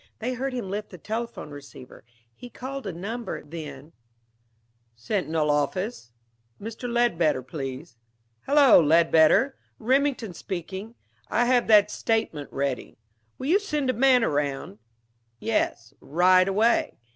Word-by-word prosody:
They 245 Hz, +3 st, -3 dB
heard 265 Hz, +2 st, -3 dB
him 245 Hz, -6 st, -4 dB
lift 205 Hz, +2 st, -4 dB
the 180 Hz, -, -11 dB
telephone 225 Hz, -3 st, -5 dB
receiver. 140 Hz, -3 st, -12 dB, 0.3 s
He 245 Hz, -, -11 dB
called 265 Hz, -1 st, -7 dB
a -, -, -2 dB
number. 215 Hz, +8 st, -5 dB
Then 155 Hz, 0 st, -9 dB, 1.0 s
"Sentinel 155 Hz, -, -1 dB
office?... 150 Hz, -, -2 dB, 0.5 s
Mr. 230 Hz, +3 st, -6 dB
Ledbetter, 170 Hz, -, +1 dB
please.... 135 Hz, 0 st, -7 dB, 0.5 s
Hello, 280 Hz, -3 st, +7 dB
Ledbetter! 165 Hz, -, +4 dB, 0.2 s
Remington 255 Hz, -3 st, 0 dB
speaking. 190 Hz, +6 st, -6 dB, 0.3 s
I 240 Hz, -, +1 dB
have 245 Hz, -1 st, +2 dB
that 210 Hz, -1 st, +6 dB
statement 215 Hz, -13 st, -2 dB
ready. 135 Hz, -2 st, -3 dB, 0.4 s
Will 260 Hz, -, -6 dB
you 350 Hz, +8 st, +4 dB
send 300 Hz, -10 st, -1 dB
a -, -, -6 dB
man 255 Hz, 0 st, +4 dB
around?... 140 Hz, -, -2 dB, 0.6 s
Yes, -, -, -1 dB
right 185 Hz, +4 st, +4 dB
away. 215 Hz, +5 st, +1 dB
200 Hz, 120 wpm, -25 LUFS, 155-245 Hz, 1.0 s, Hello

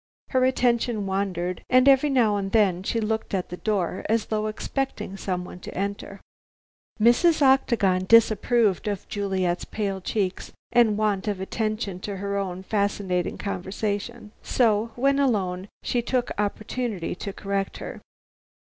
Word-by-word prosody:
Her 255 Hz, -2 st, +2 dB
attention 240 Hz, -4 st, +1 dB
wandered, 185 Hz, -2 st, -2 dB
and 255 Hz, +1 st, +5 dB
every 275 Hz, +2 st, +6 dB
now 235 Hz, -6 st, +3 dB
and 195 Hz, -1 st, -2 dB
then 195 Hz, -5 st, +3 dB
she 230 Hz, +4 st, -1 dB
looked 220 Hz, -1 st, -2 dB
at 185 Hz, -, -2 dB
the 180 Hz, -, -6 dB
door 190 Hz, -4 st, -1 dB
as 225 Hz, -1 st, +2 dB
though 215 Hz, 0 st, -1 dB
expecting 220 Hz, -1 st, -3 dB
someone 180 Hz, -2 st, -4 dB
to -, -, -9 dB
enter. 200 Hz, 0 st, -4 dB, 0.8 s
Mrs. 285 Hz, +8 st, +4 dB
Octagon 225 Hz, -9 st, +3 dB
disapproved 225 Hz, -2 st, +4 dB
of 205 Hz, -3 st, -3 dB
Juliet's 190 Hz, -3 st, -1 dB
pale 195 Hz, -3 st, -3 dB
cheeks 190 Hz, -1 st, -2 dB, 0.2 s
and 225 Hz, -4 st, +4 dB
want 210 Hz, -2 st, 0 dB
of 205 Hz, -3 st, -1 dB
attention 215 Hz, -1 st, -2 dB
to 200 Hz, +1 st, -5 dB
her 200 Hz, +1 st, -3 dB
own 190 Hz, -2 st, -3 dB
fascinating 200 Hz, -3 st, -1 dB
conversation, 205 Hz, +3 st, -4 dB
so, 225 Hz, -2 st, +2 dB
when 275 Hz, +3 st, +2 dB
alone, 195 Hz, -8 st, 0 dB, 0.2 s
she 245 Hz, -, 0 dB
took 245 Hz, +1 st, -1 dB
the -, -, -2 dB
opportunity 215 Hz, -2 st, -3 dB
to 200 Hz, +3 st, -5 dB
correct 195 Hz, 0 st, -3 dB
her. -, -, -7 dB
205 Hz, 145 wpm, -25 LUFS, 190-230 Hz, 0.8 s, every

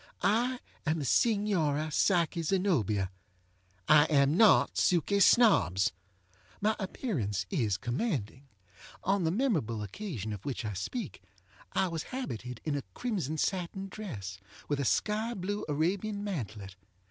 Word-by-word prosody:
I 240 Hz, +5 st, +2 dB, 0.2 s
am 155 Hz, 0 st, 0 dB
the 145 Hz, -, -3 dB
Signora 165 Hz, -, +2 dB
Psyche 170 Hz, 0 st, +2 dB
Zenobia. 150 Hz, -, +1 dB, 0.8 s
I 150 Hz, -1 st, +7 dB
am 140 Hz, -1 st, +3 dB
not 215 Hz, +2 st, +5 dB
Suky 185 Hz, +3 st, +2 dB
Snobbs. 100 Hz, -, +5 dB, 0.7 s
My 215 Hz, +2 st, +2 dB
appearance 125 Hz, -, -2 dB
is 105 Hz, -7 st, +1 dB
commanding. 130 Hz, -, -3 dB, 0.6 s
On 195 Hz, -2 st, +1 dB
the -, -, +2 dB
memorable 165 Hz, -, 0 dB
occasion 110 Hz, -, -5 dB
of 100 Hz, -, -8 dB
which 130 Hz, -4 st, -4 dB
I 105 Hz, -, -3 dB
speak 155 Hz, -, -5 dB, 0.5 s
I 190 Hz, -, +2 dB
was 165 Hz, -2 st, -3 dB
habited 125 Hz, -, -5 dB
in 150 Hz, -2 st, -1 dB
a 140 Hz, -, -1 dB
crimson 185 Hz, -, -2 dB
satin 190 Hz, +3 st, -2 dB
dress, 105 Hz, -, -7 dB, 0.3 s
with 145 Hz, -1 st, -1 dB
a 140 Hz, -, 0 dB
sky 215 Hz, -, 0 dB
blue 200 Hz, +3 st, -3 dB
Arabian 195 Hz, +7 st, -1 dB
mantelet. 110 Hz, -, -5 dB
160 Hz, 130 wpm, -30 LUFS, -, 0.8 s, I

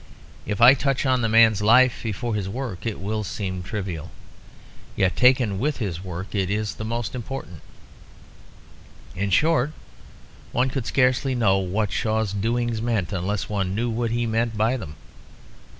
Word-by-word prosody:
If 105 Hz, +2 st, -2 dB
I 120 Hz, +3 st, +9 dB
touch 135 Hz, 0 st, 0 dB
on 130 Hz, -1 st, +2 dB
the 115 Hz, -, +1 dB
man's 110 Hz, -2 st, +5 dB
life 120 Hz, +4 st, +5 dB
before 115 Hz, +1 st, -3 dB
his 100 Hz, -3 st, -2 dB
work, 115 Hz, -3 st, -5 dB
it 110 Hz, -, -3 dB
will 105 Hz, +3 st, -2 dB
seem 95 Hz, -2 st, -4 dB
trivial; 90 Hz, -4 st, -5 dB, 0.9 s
yet 95 Hz, -1 st, +1 dB
taken 125 Hz, -6 st, +3 dB
with 150 Hz, +4 st, 0 dB
his 95 Hz, -7 st, -4 dB
work 90 Hz, +1 st, -7 dB
it 95 Hz, -3 st, 0 dB
is 105 Hz, +1 st, -2 dB
most 115 Hz, 0 st, -3 dB
important. 125 Hz, -, -7 dB, 1.5 s
In 100 Hz, +2 st, -1 dB
short, 150 Hz, -, +2 dB, 0.8 s
one 125 Hz, +2 st, +2 dB
could 130 Hz, -4 st, -3 dB
scarcely 130 Hz, 0 st, +2 dB
know 100 Hz, -5 st, +3 dB
what 95 Hz, +2 st, -1 dB
Shaw's 110 Hz, 0 st, -1 dB
doings 115 Hz, +2 st, -1 dB
meant 110 Hz, -6 st, -1 dB
unless 95 Hz, +2 st, -2 dB
one 95 Hz, -2 st, -2 dB
knew 120 Hz, +2 st, -1 dB
what 115 Hz, +1 st, -1 dB
he 120 Hz, +1 st, -1 dB
meant 115 Hz, 0 st, -1 dB
by 110 Hz, +4 st, +2 dB
them. 80 Hz, -, -7 dB
110 Hz, 155 wpm, -24 LUFS, 100-120 Hz, 1.5 s, I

